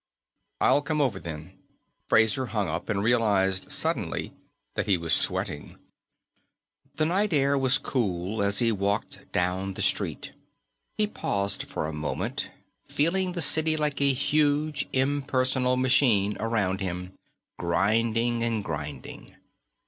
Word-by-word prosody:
"I'll 145 - +4
come 150 +1 -2
over, 125 -10 0
then." 80 -3 -9 0.5
Fraser 110 +4 +3
hung 105 -4 -1
up 80 +2 -4
and 100 -2 0
realized, 100 -5 +1
suddenly, - - -1 0.4
that - - -2
he 100 -3 +3
was 85 -1 0
sweating. 75 - 0 1.2
The 155 - +1
night 190 +4 +1
air 140 -1 +3
was 135 -1 +3
cool 100 -4 -2
as 100 0 +1
he 115 -2 +4
walked 100 -1 -3
down 95 +2 -1
the - - -2
street. - - -1 0.7
He 215 - +3
paused 100 - -2
for - - -4
a 80 - -4
moment, 75 0 -3 0.4
feeling 180 +4 +1
the 175 -2 0
city 160 0 +4
like 150 -2 -1
a 140 0 +5
huge 150 +2 +1
impersonal 130 -2 +1
machine 120 -6 +3
around 100 -4 -1
him, 90 0 -4 0.5
grinding 115 +6 +1
and 115 -2 -1
grinding. 75 -5 -7
115 Hz, 130 wpm, -26 LUFS, 95-140 Hz, 1.2 s, a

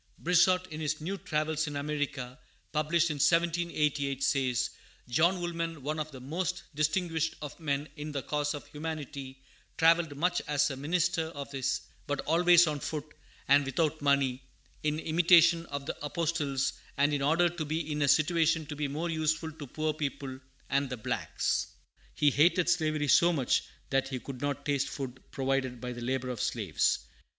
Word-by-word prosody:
Brissot, 180 +1 +3
in 155 +1 -5
his 155 0 -1
New 175 +6 -3
Travels 155 -4 -1
in 145 - -5
America, 145 -3 -3 0.3
published 155 +2 +2
in 150 - -3
1788, 150 -4 +1
says: 130 -4 +1 0.4
"John 170 +9 +3
Woolman, 165 -3 -3
one 155 +2 -2
of 155 0 -3
the 130 - -9
most 175 +7 -3
distinguished 160 +2 0
of 150 +1 -8
men 145 -2 -1
in 150 0 -6
the 140 -3 -3
cause 150 0 -1
of 145 - -8
humanity, 145 -3 -6 0.3
travelled 165 -2 +4
much 175 +3 +1
as 145 0 +2
a - - -4
minister 165 +4 0
of 145 -3 -7
his 135 -2 -2
sect, - - -1 0.2
but 145 - -1
always 175 +2 +5
on 150 -2 -2
foot, 150 +1 -5 0.3
and 140 +1 +6
without 155 +3 0
money, 140 -2 +2 0.4
in 150 0 0
imitation 170 +1 +5
of 140 -1 -5
the - - -3
Apostles, 145 -3 -1 0.2
and 145 +1 +3
in 145 - 0
order 165 +5 +4
to 170 -2 -4
be 155 +1 -3
in 150 0 -1
a 145 - +3
situation 160 +2 +3
to 150 - -6
be 145 0 -1
more 160 +5 -3
useful 160 0 0
to 150 -2 -9
poor 155 +4 -1
people 140 -3 -4 0.3
and 140 0 +1
the 125 - -4
blacks. 110 - -1 0.5
He 145 - +4
hated 170 +5 +4
slavery 155 -3 +1
so 170 +5 +6
much 135 -7 +1 0.3
that 135 0 +2
he 130 -2 -4
could 130 0 -8
not 145 0 -2
taste 140 -1 0
food 130 -2 -6
provided 135 -2 -1
by 125 +1 -5
the 120 - -8
labor 130 +1 -2
of 120 -4 -4
slaves." - - +1
150 Hz, 175 wpm, -30 LUFS, 140-165 Hz, 0.5 s, and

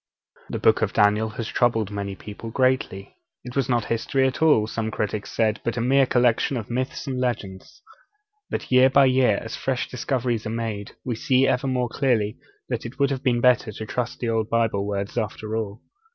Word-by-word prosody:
The - - -3
Book - - +3
of - - 0
Daniel 105 +2 +3
has 115 - -3
troubled 115 -5 +1
many 100 -1 -4
people 105 +4 -9
greatly. 130 -6 0 0.3
It 125 0 -9
was 135 -3 0
not 120 -3 +1
history 130 +4 0
at 130 +2 -1
all, 150 -9 +5
some 110 0 -3
critics 105 -1 -3
said, 110 -1 0
but 115 - -2
a - - +1
mere 135 +3 +3
collection 125 +2 +2
of 115 0 -6
myths 130 +3 -3
and 130 -3 -3
legends. 120 - -4 0.7
But - - -4
year 130 +1 +6
by 135 +1 +5
year, 130 -5 +3
as 115 - -6
fresh 130 -2 -2
discoveries 120 -3 -2
are - - -3
made, 110 -3 -4
we 125 - -1
see 130 +3 +2
ever 130 +1 +1
more 125 -1 0
clearly 115 -4 0 0.3
that - - -3
it 120 +3 -8
would 140 0 +2
have 130 -2 -2
been 125 -3 +1
better 125 -3 +3
to 110 - -6
trust 125 +2 -3
the 120 - -2
old 110 -1 0
Bible 110 -4 +1
words 100 +3 -2
after 110 0 -4
all. 110 -1 -4
115 Hz, 200 wpm, -24 LUFS, 110-130 Hz, 0.7 s, year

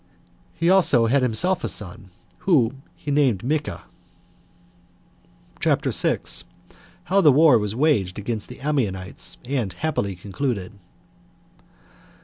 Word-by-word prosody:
He 165 - -1
also 170 -10 +5
had 135 +5 +2
himself 175 +10 +1
a - - -1
son, 100 +1 -6 0.3
whom 135 -7 +1
he 145 - -6
named 135 -8 +2
Micha. 150 +3 -2 1.8
CHAPTER - - +1
6. - - 0 0.6
How 195 +2 +2
The 155 -5 +6
War 145 -3 +5
Was 105 0 -3
Waged 120 - +1
Against 105 +1 -4
The 125 +2 -11
Ammonites 110 -11 -2
And 120 -8 -2
Happily 100 -7 -2
Concluded. 100 +2 -4
125 Hz, 115 wpm, -23 LUFS, 105-150 Hz, 1.8 s, The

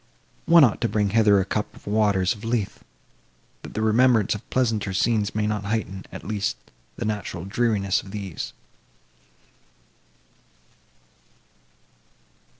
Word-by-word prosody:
One 165 -1 +8
ought 120 -6 +3
to 115 - +1
bring 105 -2 0
hither 105 -2 +5
a 95 - 0
cup 105 +2 -3
of - - -16
the 100 - -6
waters 100 -4 +2
of 105 - -13
Lethe, 115 -3 -1 0.8
that - - -11
the 110 - -1
remembrance 110 -1 +4
of 105 - -9
pleasanter 110 -6 0
scenes 105 0 +1
may 105 -1 0
not 105 -1 -2
heighten, 100 -3 -3
at - - -8
least, 105 -1 -2 0.4
the - - -4
natural 105 -4 -4
dreariness 100 -2 +1
of 95 - -13
these." 100 -4 -5
105 Hz, 135 wpm, -24 LUFS, 100-110 Hz, 0.8 s, One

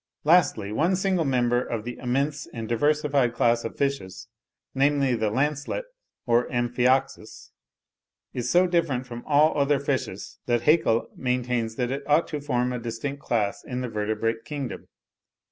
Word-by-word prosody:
Lastly, 145 - +3
one 165 - +2
single 185 -3 +1
member 120 -2 +2
of 115 -3 -4
the 120 +1 -7
immense 140 +4 -1
and 115 -2 -6
diversified 140 0 +1
class 120 0 +2
of 115 - -6
fishes, 105 -8 -3 0.4
namely, 140 -1 +2
the 110 -2 0
lancelet 145 - -1 0.4
or 120 0 +2
amphioxus, 125 0 0 0.8
is 125 0 -2
so 180 +1 +5
different 165 -8 0
from 120 -1 -8
all 150 +2 +4
other 140 0 +2
fishes, 130 -8 -3
that 120 -1 +1
Haeckel 135 -6 +3
maintains 125 -3 -1
that 125 0 -1
it 135 +1 -2
ought 150 +3 +3
to 150 -2 -4
form 125 -3 0
a 125 - -3
distinct 120 +5 -5
class 105 -6 -1
in 125 0 -4
the 125 - -3
vertebrate 110 +1 -2
kingdom. 140 +1 -6
125 Hz, 150 wpm, -25 LUFS, 115-145 Hz, 0.8 s, so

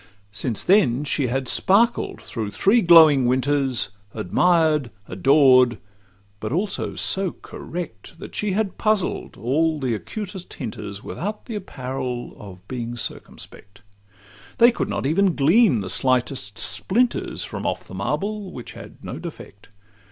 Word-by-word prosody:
Since 110 +2 -3
then 145 - +3
she 145 -2 0
had 130 +2 -2
sparkled 230 +5 +2
through 110 -3 -4
three 200 - +3
glowing 160 - +7
winters, 130 -4 +1 0.3
Admired, 155 - +2 0.2
adored; 130 +3 +4 0.6
but 110 +2 -5
also 190 +6 -2
so 190 -2 +1
correct, 160 - -8
That - - -10
she 210 -2 -1
had 205 -1 -2
puzzled 215 -4 0
all 155 +8 0
the 130 -4 -1
acutest 190 - -6
hinters, 105 -5 -7
Without 210 +5 -5
the 235 - -7
apparel 130 - -5
of 95 -2 -12
being 120 -2 -5
circumspect: 100 -2 -8 0.7
They 240 +1 +7
could - - -3
not - - -3
even 175 +5 +2
glean 160 - +4
the 95 - -5
slightest 130 -3 -1
splinters 240 +5 0
From - - -5
off - - -2
the - - -12
marble, 185 - -3
which 125 - -9
had - - -13
no - - -6
defect. 100 - -10
140 Hz, 135 wpm, -22 LUFS, 120-190 Hz, 0.7 s, glowing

